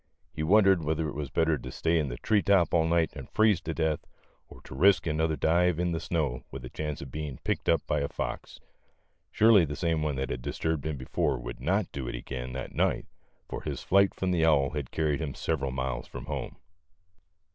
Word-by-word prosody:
He 75 - -4
wondered 95 +1 +5
whether 80 +1 -1
it 75 - -5
was 75 -2 -4
better 80 -3 +1
to - - -8
stay 80 0 +1
in 75 -3 -1
the - - -5
tree 105 - +2
top 95 -4 +3
all 80 -1 +4
night 85 -1 +2
and 70 -4 -8
freeze 110 -5 +3
to 80 - -4
death, 80 -2 +1 0.5
or - - -13
to - - -11
risk 95 +9 +4
another 80 0 0
dive 85 +3 +2
in 90 0 0
the 80 - -1
snow 75 -9 -1
with 65 -1 -8
a - - -9
chance 75 -2 -4
of 65 - -10
being 75 -3 -5
picked - - -1
up - - +2
by 75 - 0
a 70 - -1
fox. - - -5 0.7
Surely 110 -4 +6
the 75 -2 -3
same 80 -2 0
one 75 -2 -1
that 65 -1 -3
had 60 - -4
disturbed 80 +4 -2
him 75 -2 -3
before 65 0 -1
would - - -7
not 95 +9 0
do 65 -3 -5
it - - -4
again 65 +1 -6
that 65 -1 -6
night, - - +1 0.4
for - - -5
his - - -5
flight 100 +1 +3
from 95 -1 -1
the 85 -3 +2
owl 75 -4 +4
had 75 -4 -4
carried 80 -1 0
him 70 -5 -4
several 70 0 -1
miles 65 0 -3
from - - -8
home. - - -5
80 Hz, 220 wpm, -28 LUFS, 70-85 Hz, 0.7 s, Surely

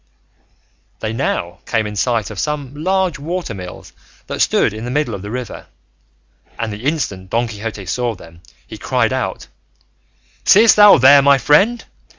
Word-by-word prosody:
They 110 0 -4
now 95 -7 -3
came 110 -2 0
in 105 0 -6
sight 115 0 -1
of 100 - -7
some 145 +3 -3
large 180 0 -1
water 170 -2 -4
mills 90 -2 -10 0.3
that - - -6
stood - - +2
in 110 +1 -7
the 120 - -5
middle 145 -2 -1
of 100 - -6
the 100 - -8
river, 125 0 -7 0.9
and 115 -2 -4
the 105 +5 -9
instant 100 - -2
Don 120 +3 0
Quixote 105 -2 -7
saw 120 +4 -2
them 85 -2 -16 0.2
he - - -11
cried - - 0
out, - - -3 1.0
"Seest 220 +3 +6
thou 210 -1 +8
there, 140 +3 +7
my 140 0 +5
friend? 195 - +2
120 Hz, 165 wpm, -17 LUFS, 105-150 Hz, 1.0 s, thou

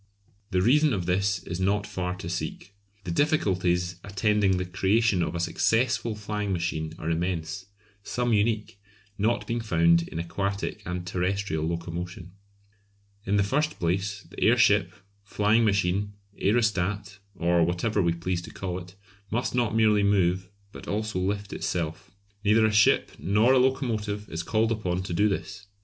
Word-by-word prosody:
The 90 0 +1
reason 150 +5 +4
of 95 -5 -2
this 95 +1 0
is 85 0 -5
not 100 +2 +1
far 90 -3 -3
to 90 - -8
seek. 90 +3 -5 0.3
The 90 - -4
difficulties 90 - +1
attending 100 -1 +1
the 90 - -2
creation 95 +2 +2
of 85 - -2
a - - -2
successful 115 +6 +1
flying 105 -1 -3
machine 85 -3 -2
are 80 - -6
immense, 85 +2 -2 0.3
some 120 +3 -1
unique, 105 -1 0 0.4
not 115 +4 +1
being 115 0 -2
found 85 -5 +3
in - - -7
aquatic 100 +4 -3
and 90 0 -4
terrestrial 90 -2 -1
locomotion. 85 +1 -5 1.0
In 100 - +2
the 100 - +4
first 150 +9 0
place, 95 +4 -1
the - - -12
airship, - - +4 0.3
flying 105 +3 +2
machine, 100 -1 +1 0.2
aerostat, 100 -2 0 0.2
or 85 -1 +2
whatever 90 +5 0
we 85 -2 +2
please 85 +1 -2
to - - -10
call 90 -2 -4
it, 90 +1 -12 0.3
must 120 +3 -1
not 120 -3 +1
merely 110 -2 +4
move, 95 -2 +2 0.2
but - - -11
also 110 -2 -2
lift 100 +2 -2
itself. 80 -3 -3 0.3
Neither 110 +1 +4
a 110 - +2
ship 105 0 +4
nor 105 +7 +3
a 130 - +5
locomotive 110 -6 -1
is 80 - -3
called 110 +5 +1
upon 95 -5 -1
to 90 - -4
do 105 +5 +3
this. 100 +1 -5
100 Hz, 155 wpm, -26 LUFS, 90-105 Hz, 1.0 s, a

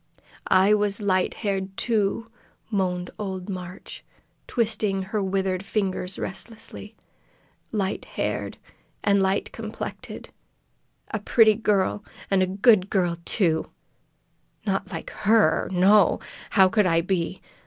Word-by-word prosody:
"I 190 +2 +5
was 205 -1 +1
light 190 -3 +1
haired, 195 -2 -3
too," 225 0 0 0.4
moaned 180 -3 -1
old 190 -2 -4
Marg, 185 -1 -7 0.6
twisting 215 -4 0
her 205 +2 -2
withered 190 -1 -1
fingers 195 -2 -2
restlessly. 220 +1 -6 0.8
"Light 200 -3 -2
haired, - - -3 0.5
and 200 -1 +3
light 190 +1 0
complected! 225 0 -7 0.8
A - - -1
pretty 220 -2 +5
girl, 205 -2 0 0.3
an' 195 -1 +4
a 185 - +3
good 200 0 +4
girl, 175 -4 +1
too! 165 -7 +1 1.0
Not 195 -2 -1
like - - -6 0.2
her. 215 -7 +4
No! 190 +1 +5 0.3
How 190 -2 +6
could 210 0 +2
I 165 -1 +3
be? 175 -1 -2
195 Hz, 115 wpm, -25 LUFS, 185-210 Hz, 1.0 s, How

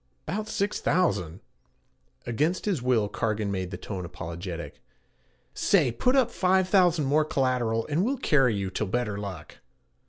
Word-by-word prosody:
''Bout 215 +2 -3
six 205 -1 -1
thousand' 95 - 0 0.8
against 150 +10 0
his 190 - 0
will 120 -4 +2
Cargan 105 0 -2
made 95 -2 -3
the 90 - -6
tone 95 -2 -6
apologetic. 85 +1 -7 0.7
'Say, 125 - +3
put 250 - +1
up 260 -4 +4
only - - -17
five 185 0 +3
thousand 175 -6 +4
more 150 +3 +3
collateral 125 -6 0
and 155 +4 0
we'll 265 +5 0
carry 135 - +3
you 100 -2 -3
till 105 - -2
better 105 -1 -2
luck.' 95 -7 -8
125 Hz, 155 wpm, -27 LUFS, -, 0.8 s, up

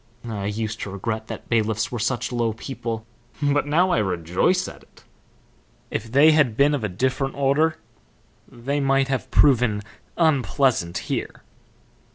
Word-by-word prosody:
I 100 -3 -3
used 110 +1 -3
to - - -4
regret 110 +3 -4
that - - -8
bailiffs 110 -2 0
were 120 - -3
such 120 +2 -1
low 120 -2 0
people, 115 -2 -5 0.3
but 145 0 +1
now 175 +5 +3
I - - +3
rejoice 95 - +1
at - - -10
it. - - -22 0.9
If 115 +1 -4
they 145 +5 +6
had 140 -8 +2
been 145 +2 +4
of 140 -6 -2
a 105 - -1
different 130 +7 -1
order 140 +3 +2 0.7
they 135 +4 -3
might 135 -1 +2
have 135 -1 -2
proven 120 -7 +3 0.3
unpleasant 135 - +2
here." - - -4
125 Hz, 150 wpm, -23 LUFS, 110-140 Hz, 0.9 s, they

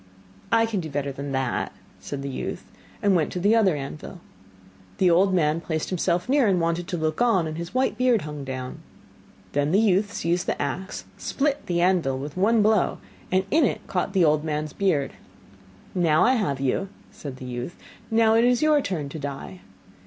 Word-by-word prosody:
'I 230 0 +4
can 225 -3 -2
do 160 -3 -5
better 140 -1 -2
than 140 +1 -6
that,' 130 -2 -1 0.3
said 140 -1 -6
the 140 - -3
youth, 135 - -5 0.4
and 200 -2 +4
went 160 -4 +1
to 180 - -2
the 205 +5 +4
other 200 -7 +4
anvil. 150 +6 -7 0.8
The 185 -2 +4
old 190 +3 +4
man 165 -3 +2
placed 160 -2 -3
himself 180 0 0
near 270 -2 +3
and 190 -3 +3
wanted 170 +1 -1
to 185 -3 -3
look 155 +2 -1
on, 225 -8 +3
and 155 0 -4
his 170 +5 -6
white 260 0 +1
beard 250 -4 +3
hung 150 -2 -6
down. 130 -1 -6 0.7
Then 145 +1 +1
the 195 - +4
youth 205 -1 +2
seized 175 -2 -1
the - - -1
axe, 185 +7 -4
split 285 0 -1
the 175 -1 +1
anvil 175 -8 +2
with 145 +2 -6
one 210 +4 +3
blow, 215 -2 +2 0.3
and 185 +1 +2
in 320 0 +4
it 245 - 0
caught 185 +1 -2
the 185 -4 +4
old 150 0 +3
man's 150 -1 -3
beard. 170 -9 +1 0.8
'Now 165 -4 +3
I 255 - +5
have 190 - 0
you,' 140 +8 -1 0.2
said 140 -3 -8
the 130 - -9
youth. 125 +6 -5 0.3
'Now 225 0 +4
it 225 +1 +4
is 245 +2 +3
your 305 -1 +4
turn 170 - -3
to 155 - -7
die. 135 -10 -6
175 Hz, 195 wpm, -25 LUFS, 145-205 Hz, 0.8 s, I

